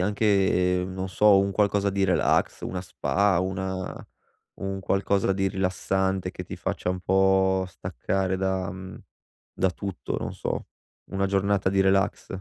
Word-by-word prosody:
anche, 95 Hz, -3 st, +2 dB
non 95 Hz, 0 st, -4 dB
so, 105 Hz, +2 st, +5 dB
un 100 Hz, 0 st, 0 dB
qualcosa 100 Hz, 0 st, +1 dB
di 100 Hz, 0 st, +1 dB
relax, 90 Hz, -2 st, +2 dB
una 90 Hz, -1 st, -3 dB
spa, 95 Hz, +2 st, +1 dB
una 95 Hz, 0 st, -3 dB, 0.7 s
un 95 Hz, 0 st, -3 dB
qualcosa 95 Hz, 0 st, +1 dB
di 95 Hz, 0 st, 0 dB
rilassante, 95 Hz, 0 st, -1 dB
che -, -, -7 dB
ti -, -, -7 dB
faccia 90 Hz, -, -2 dB
un 90 Hz, 0 st, -3 dB
po' 95 Hz, 0 st, +3 dB
staccare 95 Hz, +1 st, -2 dB
da 95 Hz, 0 st, -1 dB
mhmm, 95 Hz, 0 st, -8 dB, 0.6 s
da 95 Hz, -, +1 dB
tutto, 95 Hz, 0 st, -5 dB
non -, -, -4 dB
so. -, -, -4 dB, 0.4 s
Una 100 Hz, 0 st, 0 dB
giornata 100 Hz, 0 st, +1 dB
di 95 Hz, -, +2 dB
relax. 95 Hz, 0 st, +2 dB
95 Hz, 145 wpm, -26 LUFS, 95-100 Hz, 0.7 s, so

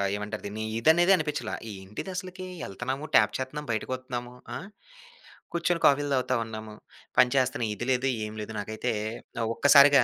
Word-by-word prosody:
ఏమంటారు 105 Hz, +1 st, -4 dB
దీన్ని! 105 Hz, +2 st, -4 dB, 0.2 s
ఇది 115 Hz, -, +4 dB
అనేదే 175 Hz, +3 st, +4 dB
అనిపించలా. 150 Hz, -8 st, -2 dB, 0.2 s
ఏంటిది 100 Hz, -, -7 dB
అసలకి? 185 Hz, 0 st, -5 dB, 0.2 s
ఎళ్తున్నాము 130 Hz, +9 st, -4 dB
ట్యాప్ 105 Hz, 0 st, +5 dB
చేత్తన్నాం, 140 Hz, +3 st, -4 dB
బయటకి 110 Hz, +2 st, -2 dB
వత్తున్నాము 125 Hz, -1 st, -6 dB, 0.2 s
ఆహ్, -, -, -6 dB, 0.9 s
కూర్చొని 170 Hz, 0 st, +1 dB
కాఫీలు 145 Hz, 0 st, +4 dB
తాగుతా 130 Hz, -1 st, +1 dB
ఉన్నాము, 110 Hz, -1 st, -7 dB, 0.4 s
పనిచేస్తున్నాం. 125 Hz, -2 st, +3 dB
ఇది 120 Hz, +4 st, -4 dB
లేదు, 130 Hz, +1 st, +2 dB, 0.2 s
ఏమి 105 Hz, 0 st, -7 dB
లేదు. 105 Hz, +1 st, -6 dB
నాకైతే 110 Hz, +4 st, -2 dB, 0.6 s
ఒక్కసారిగా 140 Hz, -1 st, +7 dB
130 Hz, 145 wpm, -28 LUFS, 110-145 Hz, 0.9 s, ఒక్కసారిగా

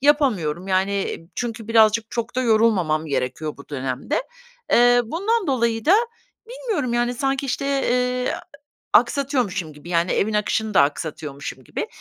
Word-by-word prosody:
yapamıyorum, 215 Hz, -, +2 dB
yani 195 Hz, +1 st, 0 dB, 0.2 s
çünkü 230 Hz, -2 st, -4 dB
birazcık 225 Hz, 0 st, +4 dB
çok 235 Hz, +1 st, -4 dB
da -, -, +2 dB
yorulmamam 205 Hz, -9 st, +2 dB
gerekiyor 140 Hz, +2 st, -2 dB
bu 140 Hz, -, -14 dB
dönemde. 135 Hz, -, -2 dB, 0.5 s
Eee, 245 Hz, 0 st, +6 dB
bundan 395 Hz, -, -1 dB
dolayı 235 Hz, -5 st, 0 dB
da 355 Hz, -, +6 dB, 0.5 s
bilmiyorum, 450 Hz, -, -2 dB
yani, 240 Hz, +1 st, +1 dB
sanki, 270 Hz, +2 st, -1 dB
işte, 270 Hz, +2 st, -2 dB
eee, 250 Hz, -2 st, 0 dB
a -, -, -5 dB, 0.6 s
aksatıyormuşum 235 Hz, -, -2 dB
gibi 150 Hz, +4 st, -13 dB
yani, 170 Hz, 0 st, +1 dB
evin 215 Hz, +2 st, +1 dB
akışını 210 Hz, +1 st, 0 dB
da 145 Hz, -, +6 dB
aksatıyormuşum 145 Hz, -2 st, -3 dB
gibi. -, -, -4 dB
225 Hz, 140 wpm, -22 LUFS, 170-255 Hz, 0.6 s, Eee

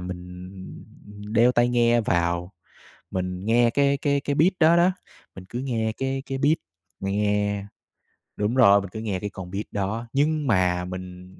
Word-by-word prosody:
mình 90 Hz, 0 st, -8 dB, 0.8 s
đeo 120 Hz, +2 st, +4 dB
tai 120 Hz, 0 st, +3 dB
nghe 120 Hz, -1 st, +3 dB
vào, 85 Hz, -2 st, -1 dB, 0.6 s
mình 90 Hz, +1 st, -3 dB
nghe 120 Hz, +1 st, +4 dB
cái 140 Hz, +3 st, +2 dB
cái 140 Hz, 0 st, +1 dB
cái 145 Hz, 0 st, -2 dB
beat 170 Hz, +7 st, +4 dB
đó 165 Hz, +1 st, +5 dB
đó, 175 Hz, +2 st, +4 dB, 0.4 s
mình 95 Hz, -1 st, -10 dB
cứ 120 Hz, -, -4 dB
nghe 115 Hz, -4 st, -1 dB
cái 135 Hz, 0 st, -2 dB
cái 135 Hz, -, -4 dB
beat 145 Hz, +4 st, +3 dB, 0.4 s
nghe 100 Hz, 0 st, 0 dB, 0.7 s
đúng 105 Hz, +4 st, -1 dB
rồi, 100 Hz, -6 st, +6 dB
mình 100 Hz, -, -7 dB
cứ 110 Hz, -, -7 dB
nghe 105 Hz, -4 st, -3 dB
cái 105 Hz, -, -4 dB
con 95 Hz, -2 st, -9 dB
beat 100 Hz, +3 st, -3 dB
đó 105 Hz, +4 st, -3 dB
nhưng 150 Hz, +1 st, +1 dB
mà 90 Hz, -5 st, +2 dB
mình 90 Hz, 0 st, -9 dB
105 Hz, 170 wpm, -24 LUFS, 95-130 Hz, 0.8 s, rồi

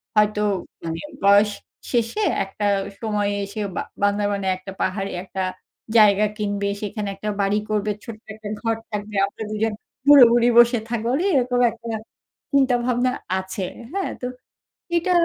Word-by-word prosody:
হয়তো 210 Hz, 0 st, +3 dB, 0.4 s
মানে 165 Hz, 0 st, -4 dB, 0.2 s
বয়স 200 Hz, +1 st, +6 dB, 0.4 s
শেষে 240 Hz, -, 0 dB, 0.2 s
একটা 195 Hz, +2 st, -5 dB, 0.4 s
সময়ে 210 Hz, -2 st, 0 dB
এসে 200 Hz, +2 st, -7 dB, 0.2 s
বা -, -, -1 dB, 0.2 s
বান্দারাবনে 205 Hz, -1 st, +1 dB
একটা 195 Hz, +1 st, -9 dB
পাহাড়ে 195 Hz, +1 st, -1 dB
একটা 190 Hz, 0 st, -5 dB, 0.6 s
জায়গা 210 Hz, -1 st, +6 dB
কিনবে, 205 Hz, -1 st, -1 dB
সেখানে 210 Hz, 0 st, -3 dB
একটা 210 Hz, +2 st, -4 dB
বাড়ি 200 Hz, +1 st, +2 dB
করবে 210 Hz, 0 st, 0 dB
ছোট্ট 225 Hz, -3 st, -9 dB
একটা 215 Hz, 0 st, -9 dB
ঘর 225 Hz, -1 st, +1 dB, 0.2 s
থাকবে, 210 Hz, 0 st, -5 dB
আমরা 200 Hz, +2 st, -7 dB
দুজন 215 Hz, 0 st, 0 dB, 0.3 s
বুড়ো 285 Hz, -3 st, +10 dB
বুড়ি 240 Hz, 0 st, +4 dB
বসে 240 Hz, 0 st, +7 dB
থাকবো, 230 Hz, -1 st, -2 dB
মানে 330 Hz, +7 st, +1 dB
এরকম 250 Hz, -1 st, +2 dB
একটা 230 Hz, 0 st, -9 dB, 0.6 s
চিন্তাভাবনা 250 Hz, -2 st, +2 dB, 0.3 s
আছে। 190 Hz, +1 st, -6 dB, 0.3 s
হ্যাঁ 390 Hz, 0 st, -2 dB
তো, -, -, -3 dB, 0.7 s
এটা 340 Hz, +2 st, +1 dB
210 Hz, 140 wpm, -22 LUFS, 200-240 Hz, 0.7 s, বুড়ো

